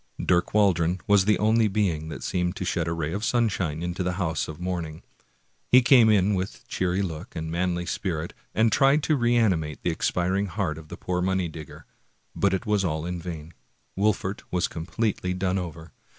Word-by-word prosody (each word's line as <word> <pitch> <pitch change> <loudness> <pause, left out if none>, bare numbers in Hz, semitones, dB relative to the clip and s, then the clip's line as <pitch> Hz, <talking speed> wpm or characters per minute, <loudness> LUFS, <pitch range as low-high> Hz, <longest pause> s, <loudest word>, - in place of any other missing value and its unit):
Dirk 90 -1 +2
Waldron 90 -4 +3
was 100 -3 +4
the 105 0 +3
only 110 +1 +3
being 95 -7 -1
that - - -7
seemed 90 -1 -1
to 95 - -4
shed 85 -1 -1
a - - -1
ray 80 -1 -2
of 105 +2 -3
sunshine 95 -10 0
into 90 +1 -3
this 90 0 -1
house 85 -4 -1
of 80 0 -8
mourning. 85 -3 -4 0.6
He 125 0 +6
came 120 -3 +6
in 105 -1 +3
with 95 +1 -4
cheery 95 +1 0
look 85 +1 -6
and 80 -1 -4
manly 85 0 -1
spirit, 85 -2 -3 0.2
and 110 0 +3
tried 140 +5 +4
to 155 - +2
reanimate 110 - +1
the 85 - +1
expiring 95 +4 0
heart 80 -3 -2
of 80 - -13
the - - -8
poor 90 -1 -2
money 95 -1 0
digger, 80 -2 -10 0.5
but 100 - +2
it 95 +4 -2
was 105 -2 +1
all 80 -3 -1
in 90 -1 -4
vain. 80 -2 -7 0.4
Wolfert 100 -1 0
was 90 - 0
completely 90 +2 -2
done 95 +1 0
over. 80 -2 -7
90 Hz, 190 wpm, -26 LUFS, 85-100 Hz, 0.6 s, He